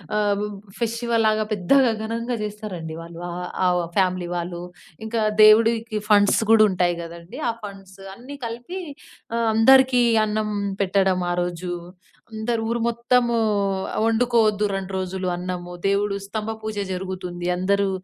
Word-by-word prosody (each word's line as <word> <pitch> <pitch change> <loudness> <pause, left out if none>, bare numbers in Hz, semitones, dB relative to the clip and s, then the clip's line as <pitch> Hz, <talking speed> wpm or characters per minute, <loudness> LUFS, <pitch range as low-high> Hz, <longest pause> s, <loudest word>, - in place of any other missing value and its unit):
ఆహ్, 205 -1 +2
బ్-బ్ 210 -1 -5 0.2
ఫెస్టివల్‌లాగా 230 -2 +1
పెద్దగా 245 +7 +3
ఘనంగా 230 +2 -3
జేస్తారండి 205 -6 -6
వాళ్ళు, 170 0 -10
ఆహ్, 180 +1 -5 0.4
ఆ - - -9
ఫ్యామిలీ 185 -2 +1
వాళ్ళు, 175 0 -4 0.4
ఇంకా 225 0 -1 0.2
దేవుడికి 225 +1 +5
ఫండ్స్ 205 -1 +5
గూడుంటాయి 190 -6 +4
గదండీ, 170 +7 -10
ఆ - - +2
ఫండ్స్ 195 -1 -10 0.2
అన్నీ 255 +7 -10
కలిపి, 240 +11 -6 0.6
ఆహ్, 230 - +1
అందరికీ 255 +3 +6 0.2
అన్నం 215 0 -1 0.3
పెట్టడం 190 -1 +2
ఆ - - +1
రోజూ, 175 0 -4 0.6
అందరు 225 +1 -2
ఊరు 235 0 -1
మొత్తమూ 235 0 +1 0.6
ఆహ్, - - 0
ఒండుకోవద్దు 225 -3 +2
2 195 0 -5
రోజులు 185 0 -3
అన్నము, 180 0 -5
దేవుడు 200 0 +1
స్తంభ 220 +2 -3
పూజ 215 -1 -4 0.2
జరుగుతుంది 180 -1 -4
అందరూ 200 +2 +1
210 Hz, 130 wpm, -23 LUFS, 185-230 Hz, 0.6 s, అందరికీ